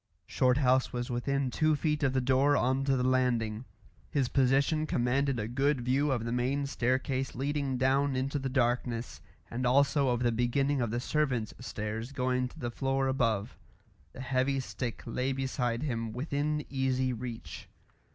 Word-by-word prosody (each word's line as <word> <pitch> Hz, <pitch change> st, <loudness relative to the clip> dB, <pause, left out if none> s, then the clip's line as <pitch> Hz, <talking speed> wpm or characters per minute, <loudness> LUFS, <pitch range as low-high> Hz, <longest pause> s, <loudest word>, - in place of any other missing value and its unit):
Shorthouse 130 Hz, 0 st, +2 dB
was 120 Hz, 0 st, -3 dB
within 135 Hz, +2 st, -1 dB
two 155 Hz, +2 st, +2 dB
feet 150 Hz, +1 st, -1 dB
of 135 Hz, -3 st, +2 dB
the 130 Hz, -, +2 dB
door 135 Hz, +3 st, +3 dB
on 130 Hz, +2 st, +1 dB
to 135 Hz, -1 st, +2 dB
the 125 Hz, -, 0 dB
landing; 125 Hz, -3 st, +1 dB, 0.4 s
his 135 Hz, -4 st, 0 dB
position 140 Hz, +4 st, +2 dB
commanded 130 Hz, +1 st, +1 dB
a 105 Hz, -, -2 dB
good 135 Hz, +3 st, +1 dB
view 135 Hz, +4 st, +1 dB
of 120 Hz, -3 st, -1 dB
the 115 Hz, -, -2 dB
main 130 Hz, +4 st, 0 dB
staircase 130 Hz, 0 st, -1 dB
leading 140 Hz, 0 st, -1 dB
down 135 Hz, +2 st, +2 dB
into 135 Hz, +3 st, -1 dB
the 135 Hz, 0 st, -3 dB
darkness, 120 Hz, -2 st, -1 dB, 0.3 s
and 125 Hz, +2 st, -3 dB
also 140 Hz, +2 st, +3 dB
of 120 Hz, 0 st, 0 dB
the 120 Hz, -, +3 dB
beginning 130 Hz, +4 st, +1 dB
of 120 Hz, -, 0 dB
the 120 Hz, +2 st, -1 dB
servants' 125 Hz, -5 st, -1 dB
stairs 110 Hz, +1 st, -5 dB
going 125 Hz, -1 st, 0 dB
to -, -, -15 dB
the 120 Hz, -1 st, -4 dB
floor 135 Hz, +2 st, 0 dB
above; 115 Hz, -4 st, 0 dB, 0.6 s
the -, -, -9 dB
heavy 130 Hz, +1 st, 0 dB
stick 125 Hz, -2 st, -5 dB
lay 125 Hz, +3 st, -1 dB
beside 130 Hz, -2 st, -1 dB
him 115 Hz, -6 st, -2 dB
within 145 Hz, +3 st, -2 dB
easy 130 Hz, -1 st, 0 dB
reach. 120 Hz, -1 st, -7 dB
130 Hz, 165 wpm, -30 LUFS, 120-140 Hz, 0.6 s, door